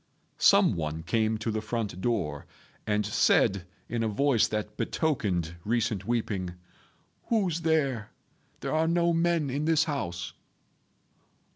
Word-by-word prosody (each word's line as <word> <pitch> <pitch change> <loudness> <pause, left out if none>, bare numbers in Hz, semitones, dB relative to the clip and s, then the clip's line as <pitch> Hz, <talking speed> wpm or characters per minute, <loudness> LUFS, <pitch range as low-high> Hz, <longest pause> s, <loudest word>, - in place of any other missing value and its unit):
Some 200 - +5
one 80 -1 -3
came 110 +5 +1
to 110 +1 -2
the 110 0 -2
front 110 -6 -3
door, 90 -11 -1 0.4
and 105 0 +1
said, 100 -2 +2 0.2
in 120 0 -2
a 115 - +1
voice 120 +2 +2
that 105 0 -4
betokened 95 - -1
recent 110 -3 -1
weeping, 100 -7 -2 0.7
"Who's 185 -8 +1
there? 140 -9 +1 0.5
There - - -3
are 160 +1 +2
no 170 0 +2
men 165 -4 +1
in 145 +3 -1
this 160 -1 +4
house." 90 - -4
115 Hz, 130 wpm, -28 LUFS, 100-155 Hz, 0.7 s, Some